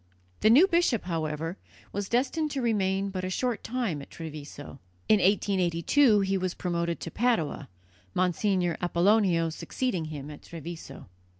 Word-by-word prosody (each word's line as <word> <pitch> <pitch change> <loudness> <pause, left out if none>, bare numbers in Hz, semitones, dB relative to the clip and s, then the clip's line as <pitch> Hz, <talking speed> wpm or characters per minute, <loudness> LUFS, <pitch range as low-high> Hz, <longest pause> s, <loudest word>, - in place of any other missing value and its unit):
The 215 - +4
new 275 +11 +8
bishop, 340 - +2
however, 165 0 -3 0.3
was 200 0 -3
destined 275 +6 +1
to 280 -2 -3
remain 195 -3 +1
but 185 -1 -4
a 185 - -2
short 240 +4 -1
time 225 - -2
at - - -11
Treviso. 145 -3 -9 0.3
In 215 - +5
1882 200 - +3
he 195 0 0
was 185 -1 -2
promoted 170 -2 -2
to 165 - -5
Padua, 170 - 0 0.5
Monsignor 180 -1 +1
Apollonio 175 -1 +3
succeeding 185 0 -2
him 150 -1 -7
at 145 - -11
Treviso. 165 0 -9
185 Hz, 140 wpm, -28 LUFS, 165-220 Hz, 0.5 s, new